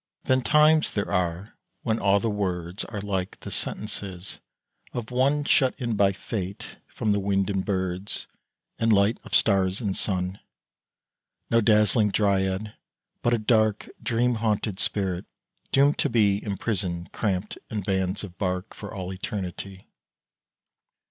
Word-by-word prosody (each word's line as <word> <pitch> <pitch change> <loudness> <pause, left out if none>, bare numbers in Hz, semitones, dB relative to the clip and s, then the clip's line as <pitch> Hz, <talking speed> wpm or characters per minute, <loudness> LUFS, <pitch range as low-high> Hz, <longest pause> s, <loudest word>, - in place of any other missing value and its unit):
Then 130 0 +3
times 150 +5 +5
there 100 - -2
are 90 +2 -1 0.3
when 110 -1 0
all 100 0 +4
the 115 - -1
words 90 -2 -2
Are 105 -3 -5
like 95 -2 -3
the - - -7
sentences 95 -3 -5 0.5
of 120 -2 -4
one 140 +4 +2
Shut 135 -3 +3
in 120 -4 -1
by 100 -1 +4
Fate 100 0 -5
from 105 -2 0
wind 100 0 +1
and 95 -1 0
birds 95 -1 -2 0.5
And 115 0 +3
light 100 +2 +4
of - - -2
stars 95 -2 +3
and 100 -6 -1
sun, 95 0 0 1.1
No 115 - +5
dazzling 105 0 +4
dryad, 100 0 +1 0.5
but 120 0 +3
a - - 0
dark 110 -1 +2
Dream 120 +1 +1
haunted 105 -3 0
spirit 95 -4 0 0.5
doomed 140 +2 +4
to - - +2
be 105 -3 +3
Imprisoned, 95 -4 -2
crampt 100 -2 -2
in 105 -2 -2
bands 95 0 -1
of 95 -3 -9
bark, 90 0 -2
For 100 - -8
all 95 -1 -5
eternity. 95 0 -5
100 Hz, 140 wpm, -26 LUFS, 95-110 Hz, 1.1 s, times